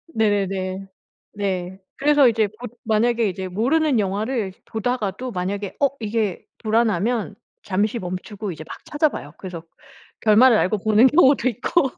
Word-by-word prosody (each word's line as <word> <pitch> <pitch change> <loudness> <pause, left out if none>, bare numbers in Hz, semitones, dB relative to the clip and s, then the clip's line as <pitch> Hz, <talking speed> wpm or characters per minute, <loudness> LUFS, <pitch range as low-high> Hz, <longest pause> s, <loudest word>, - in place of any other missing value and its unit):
네네네. 195 -3 0 0.5
네. 190 -2 -3 0.2
그래서 290 -1 +5
이제 220 -2 +2
보 215 +5 -10 0.2
만약에 230 +1 +2
이제 190 0 -4
모르는 260 - +2
영화를 205 +2 -2
보다가도 235 +1 -2
만약에 195 0 -4
어 280 - +5
이게 215 -3 -2
불안하면 220 -1 0 0.3
잠시 210 +4 0
멈추고 190 +3 -5
이제 160 -2 -8
막 - - -8
찾아봐요. 295 - -1
그래서 180 -4 -7 0.6
결말을 225 +3 +6
알고 210 +3 +1
보는 215 +4 +4
경우도 270 -3 +4
있고. 270 - 0
215 Hz, 310 characters per minute, -22 LUFS, 195-245 Hz, 0.6 s, 결말을